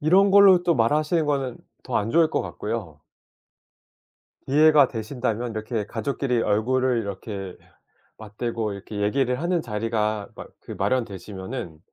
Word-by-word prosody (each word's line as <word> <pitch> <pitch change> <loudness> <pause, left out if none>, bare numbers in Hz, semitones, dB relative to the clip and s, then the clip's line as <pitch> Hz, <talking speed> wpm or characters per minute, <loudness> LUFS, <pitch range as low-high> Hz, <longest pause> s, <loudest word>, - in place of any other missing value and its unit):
이런 190 +6 +4
걸로 195 -2 +7
또 175 -1 +2
말하시는 150 +6 +1
거는 135 -4 -1 0.2
더 - - -2
안 105 +2 -1
좋을 165 +2 +4
것 - - 0
같고요. - - -5 1.5
이해가 150 -1 +5
되신다면 120 0 -3
이렇게 110 0 -3
가족끼리 125 +1 -1
얼굴을 125 +4 +1
이렇게 100 -2 -6 0.6
맞대고 110 0 -4
이렇게 100 +1 -7
얘기를 125 +5 0
하는 175 +1 0
자리가 110 -2 -2
마 - - -8 0.2
그 - - -9
마련되시면은 105 -5 -4
120 Hz, 305 characters per minute, -24 LUFS, 105-145 Hz, 1.5 s, 걸로